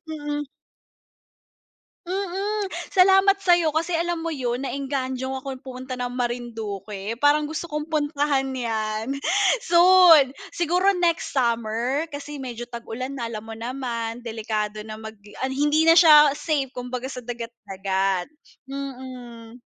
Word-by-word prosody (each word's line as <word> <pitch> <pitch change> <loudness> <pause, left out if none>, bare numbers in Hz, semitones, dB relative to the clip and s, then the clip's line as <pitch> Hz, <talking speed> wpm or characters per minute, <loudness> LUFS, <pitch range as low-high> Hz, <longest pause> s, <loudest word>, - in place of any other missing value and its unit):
Mm. 295 -1 -3 1.6
Mm. 390 +2 -2 0.2
Salamat 385 +1 +5
sa'yo 345 -4 +3
kasi 330 +2 0
alam 340 0 -1
mo 330 - -2
'yon 250 -5 -2
na-engganyo 265 -1 -3
akong 270 0 -6
pumunta 255 0 -7
ng 245 0 -3
Marinduque. 225 -4 -4
Parang 295 +2 +3
gusto 315 +2 -4
kong 300 -1 -5
puntahan 290 -3 0
'yan, 225 +1 -2 0.5
soon, 345 -4 +7 0.2
siguro 360 +4 +2
next 345 -2 0
summer 235 +2 0
kasi 290 0 -6
medyo 240 -2 -7
tag-ulan 245 +3 -6
na 235 - -3
alam 225 -2 -5
mo 225 0 -9
naman 235 -1 -4
delikado 215 -2 -3
na 215 0 -8
mag 220 -1 -9 0.3
hindi 295 +3 +2
na 330 - +7
siya 300 -3 +8
safe 290 -5 -1
kumbaga 250 +1 -5
sa 250 -3 -8
dagat 235 -1 -5 0.2
dagat. 195 0 -1 0.4
Mm. 250 -4 -8
260 Hz, 125 wpm, -24 LUFS, 230-310 Hz, 1.6 s, siya